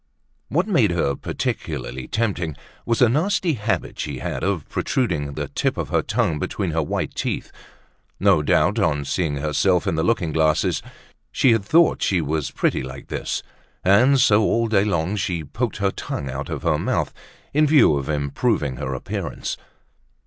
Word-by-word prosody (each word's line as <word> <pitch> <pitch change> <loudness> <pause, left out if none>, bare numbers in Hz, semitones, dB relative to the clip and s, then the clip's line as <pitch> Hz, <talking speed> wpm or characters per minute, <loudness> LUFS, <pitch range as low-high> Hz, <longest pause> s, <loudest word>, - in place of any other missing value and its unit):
What 170 - +1
made 130 - +3
her 85 -5 +1
particularly 65 0 -4
tempting 95 -9 -1 0.3
was 115 +2 +3
a - - +7
nasty 170 - +1
habit 110 -3 -2
she 70 -3 -3
had - - -4
of 95 -6 -1
protruding 75 - -1
the - - -3
tip - - -1
of - - -3
her - - +2
tongue 75 -3 0
between 95 +2 -2
her 80 +1 +1
white 75 - -2
teeth. - - -3 0.7
No 95 -5 +4
doubt 75 - +2
on 70 0 +1
seeing 75 +1 -1
herself 75 +5 +1
in - - 0
the 80 0 0
looking 90 -6 +1
glasses 80 0 +2 0.5
she 130 - +4
had 115 -3 +2
thought 165 +10 +4
she 95 - +2
was 75 -1 -1
pretty - - 0
like 65 +1 -8
this; - - -3 0.4
and 125 +9 +5
so, 105 -3 +5
all 115 +2 +2
day 105 -2 +3
long, 95 0 0
she 90 -4 -2
poked 110 - -3
her 100 -2 +1
tongue 70 -7 -5
out 70 +2 -5
of - - -4
her - - +2
mouth, - - -1 0.4
in 150 +1 +4
view 145 - +5
of 70 +1 -3
improving 75 - 0
her 65 +1 -3
appearance. 65 - -4
90 Hz, 170 wpm, -22 LUFS, 75-115 Hz, 0.7 s, a